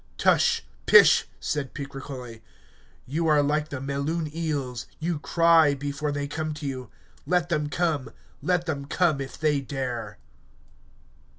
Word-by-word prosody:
Tush, - - +3 0.2
pish, - - +7
said 145 -3 -3
Picrochole, 135 -5 -7 0.6
you 160 +5 -1
are 150 -2 +4
like 150 +1 0
the 140 - -5
Melun 145 +3 -2
eels, 140 -7 -3
you 165 -1 -2
cry 165 -2 +4
before 145 +1 -3
they 145 0 -2
come 155 +1 -3
to 155 -1 -7
you. 130 -2 -5 0.4
Let 175 -1 +1
them 150 -3 0
come, 155 -5 -1 0.3
let 180 -1 +1
them 140 -4 -3
come, 155 -1 +1
if 135 -2 -7
they 150 -2 +2
dare. 125 -6 -4
145 Hz, 135 wpm, -26 LUFS, 135-160 Hz, 0.6 s, pish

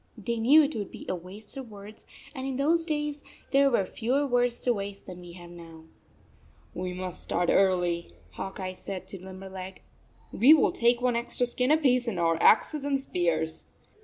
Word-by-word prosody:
They 230 +2 -3
knew 285 +8 +6
it 290 +1 -2
would 205 -3 -4
be - - -10
a - - -1
waste 185 +4 -8
of 260 -3 -7
words; 210 +1 -12 0.3
and 265 -2 -5
in 265 - -3
those 325 +5 +2
days 295 -2 -3 0.3
there 275 0 +5
were 220 -7 +1
fewer 250 +9 -1
words 245 -2 +1
to 245 - +2
waste 200 -1 -6
than 180 -1 -9
we 175 -1 -11
have 175 -1 -12
now. 165 -2 -12 0.9
"We 180 0 -4
must 180 0 -6
start 175 0 -1
early," 180 -3 +1 0.2
Hawk 195 +1 -7
Eye 185 -1 -4
said 185 0 -7
to 195 - -8
Limberleg. 190 0 -9 0.2
" - - -33
We 285 +7 +7
will 310 - +3
take 240 +1 +2
one 250 -1 +1
extra 235 +1 -1
skin 250 +1 0
apiece 260 -5 +3
and 200 -6 -2
our 165 -1 +1
axes 295 +6 +4
and 280 -1 0
spears." 165 - -2
215 Hz, 190 wpm, -28 LUFS, 185-260 Hz, 0.9 s, We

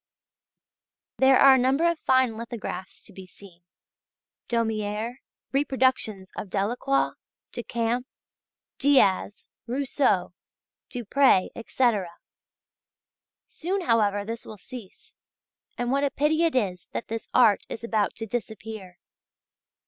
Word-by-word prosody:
There 265 0 +6
are 275 -1 +8
a - - +5
number 270 +7 +3
of 340 -2 0
fine 260 -5 +2
lithographs 230 -5 -7
to - - -13
be 190 0 -11
seen: 180 -1 -16 0.9
Daumiers, 225 +1 -2 0.3
reproductions 260 -8 +1
of 200 - -6
Delacroix, 240 +8 0 0.4
Decamps, 240 +1 -2 0.7
Diaz, 230 -8 +2 0.2
Rousseau, 250 -8 0 0.6
Dupré, 245 -4 +3
etc. 230 -5 0 1.4
Soon, 375 +4 -3
however, 210 - +2
this 230 +2 -5
will 215 - -10
cease, 230 -1 -12 0.6
and 245 0 -1
what 280 +1 +1
a 285 - +2
pity 310 +4 +1
it 325 - 0
is 185 -8 -1
that - - -4
this 225 0 -5
art 225 -5 +5
is 230 - -7
about 220 -3 0
to 225 - -5
disappear! 220 -4 -6
235 Hz, 110 wpm, -26 LUFS, 205-265 Hz, 1.4 s, are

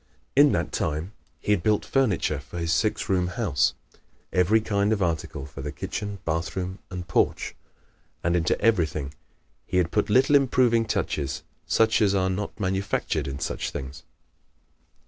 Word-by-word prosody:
In 145 +1 +7
that - - -1
time 80 +5 -2 0.3
he - - -2
had 100 -5 +3
built 105 +3 +2
furniture 130 -9 +1
for - - -10
his 85 -1 0
six 75 - 0
room 90 -2 +2
house 90 - +1 0.6
every 90 +5 +4
kind 105 -1 0
of 105 -3 +1
article 80 -5 -2
for 70 0 -9
the 75 +1 -4
kitchen, 100 +7 -4
bathroom 90 +4 -2
and 90 -2 -6
porch. - - +1 0.7
And 85 +1 +2
into 85 -2 +1
everything 80 -10 +1 0.5
he 90 - -1
had 90 -1 +2
put 105 -1 +1
little 130 +6 +5
improving 125 -4 +4
touches 75 -8 -2 0.2
such 110 0 +3
as 100 -2 +3
are 95 -1 +2
not 100 +4 -4
manufactured 95 -6 -1
in 70 0 -4
such - - -3
things. 65 +1 -7
95 Hz, 155 wpm, -26 LUFS, 80-105 Hz, 0.7 s, In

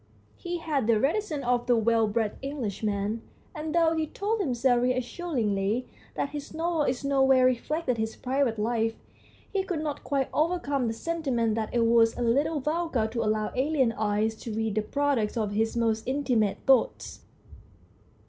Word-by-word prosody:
He 350 -1 -4
had 300 -8 -1
the 225 -2 +4
reticence 305 - -1
of 245 0 +1
the 245 - +4
well 225 0 +3
bred 210 0 -1
Englishman, 215 -5 -2 0.3
and 310 -1 -4
though 330 -1 +4
he 315 -1 -1
told 425 +7 -2
himself 250 - +2
reassuringly 245 - -1 0.3
that 280 - -1
his 290 0 -7
novel 330 0 0
in 255 - +1
no 275 -1 +2
way 265 -1 +5
reflected 255 +1 0
his 220 0 -2
private 260 -3 0
life, 225 +1 0 0.6
he 395 - +2
could 340 -5 -3
not 295 -2 -4
quite 275 -2 -1
overcome 295 -5 0
the 225 - -1
sentiment 255 -6 -1
that 220 0 -2
it 235 -1 +2
was 230 -1 +4
a 245 - -1
little 285 +6 +1
vulgar 305 -4 0
to 230 +1 -2
allow 215 0 0
alien 265 -2 +2
eyes 215 0 0
to 230 - -7
read 220 -1 -1
the 215 - +1
product 255 -2 0
of 215 -3 -1
his 225 +3 0
most 225 -1 +1
intimate 255 -6 +1
thoughts. 270 - +2
250 Hz, 165 wpm, -27 LUFS, 225-295 Hz, 0.6 s, way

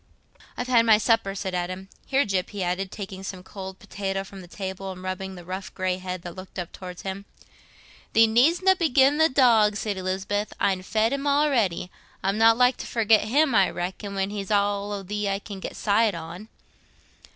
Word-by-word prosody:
"I've 245 - -2
had 235 -2 +3
my 220 -1 +7
supper," 215 -3 +1
said 190 -1 -4
Adam. 185 +2 -3 0.2
"Here, 275 +1 +2
Gyp," 190 -3 -1
he 205 -3 -4
added, 180 +2 -2
taking 190 -2 -7
some 190 -1 -7
cold 190 0 -8
potato 195 -1 -4
from 195 0 -11
the 180 - -12
table 190 +1 -6
and 185 0 -10
rubbing 190 0 -4
the 175 -1 -11
rough 185 +2 -6
grey 185 -1 -1
head 185 -1 -5
that 175 - -7
looked 185 +1 -11
up 175 -2 -4
towards 180 -1 -9
him. 195 +1 -5 0.9
"Thee 225 - +7
needstna 330 +12 +4
be 330 -3 +2
gi'in' 275 +3 +4
th' 320 -1 +4
dog," 225 -5 +5
said 210 -2 -2
Lisbeth; 195 +3 -2
"I'n 190 -2 +1
fed 220 +5 +1
him 280 0 -3
well 285 +1 +3
a'ready. 210 - 0 0.3
I'm 195 +3 0
not 225 0 +6
like 250 +1 +4
to - - -7
forget 220 -2 +3
him, 275 +5 +2
I 195 -3 +4
reckon, 190 +3 -5
when 195 +1 -1
he's 200 -2 -5
all 205 0 +1
o' 200 -1 -4
thee 210 +1 -2
I 195 - 0
can 200 -1 -9
get - - -6
sight 210 -1 +2
on." 170 +5 -8
200 Hz, 205 wpm, -25 LUFS, 185-225 Hz, 0.9 s, my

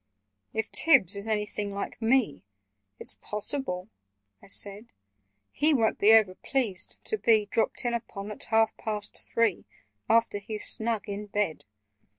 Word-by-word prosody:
"If 220 0 -3
Tibbs 255 - +5
is 200 +2 -6
anything 210 -1 -2
like 200 - -5
me, 225 - +1 0.6
It's - - -7
possible," 210 -3 -2 0.5
I - - -16
said, 200 +3 0 0.6
"He 300 +1 +2
won't 225 -4 +1
be 210 - +6
over 215 -4 +5
pleased 205 -4 -2
to 435 - -1
be 220 -3 +3
Dropped 225 +4 -1
in 240 - 0
upon 210 -3 -5
at 210 - -3
half 225 0 +2
past 210 -2 -4
three, 230 -5 -1 0.4
After 230 -2 +3
he's 210 +1 -3
snug 225 -1 +1
in 205 +1 -5
bed. 205 -6 -2
215 Hz, 145 wpm, -27 LUFS, 200-230 Hz, 0.6 s, be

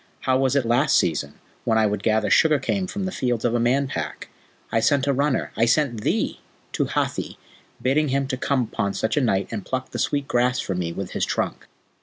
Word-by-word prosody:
How 130 - +1
was 135 +1 +2
it 140 -3 +2
last 120 +6 +3
season, 75 -4 0 0.3
when 110 - +2
I 110 - +4
would 105 -1 -1
gather 110 0 +1
sugar 155 -2 +5
cane 185 +8 -1
from 195 +1 -4
the 185 - -2
fields 125 - -1
of 120 - +2
a 120 - +2
Man 130 +4 +2
Pack? 75 - -5 0.4
I 115 - +2
sent 140 +3 +2
a 140 - +2
runner 140 +1 0
I 115 - +3
sent 120 -2 +1
thee! - - -1 0.3
to - - 0
Hathi, - - -2 0.4
bidding 135 +5 +2
him 135 0 0
to 130 - 0
come 130 0 0
upon 100 -3 -2
such 110 0 0
a 150 - +2
night 100 -6 +1
and 105 -4 -4
pluck 130 +3 -4
the 120 - -4
sweet 140 +3 0
grass 125 +1 +1
for 95 - -2
me 90 -2 -2
with 95 +2 -5
his - - -2
trunk." - - -2
125 Hz, 225 wpm, -23 LUFS, 110-140 Hz, 0.4 s, sugar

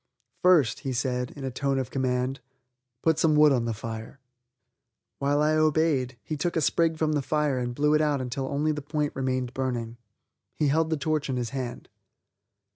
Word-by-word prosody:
"First," 165 -10 +4
he 135 - -3
said, 125 0 -1
in 140 - -8
a 130 - -3
tone 135 +2 -1
of 130 -2 -3
command, 130 0 -1 0.6
"put 160 -2 +3
some 155 -2 +3
wood 150 0 +6
on 125 -3 +1
the 115 - -1
fire." 115 +4 -7 1.0
While 145 +2 +2
I 155 +1 +3
obeyed, 155 -5 +2
he 155 - -4
took 170 +4 -2
a 160 - +2
sprig 165 +1 +2
from 155 -1 +1
the 150 -2 +1
fire 150 -2 0
and 120 -1 -3
blew 150 +2 +2
it 155 - +4
out 150 -2 +1
until 130 +1 -3
only 145 +3 0
the 150 -1 -3
point 150 0 -2
remained 130 -2 -1
burning. 120 -3 -3 0.6
He 150 - +1
held 160 +3 +2
the 160 - 0
torch 155 -1 -1
in 130 - -1
his 120 -2 -3
hand. 130 -3 -5
140 Hz, 195 wpm, -27 LUFS, 125-150 Hz, 1.0 s, wood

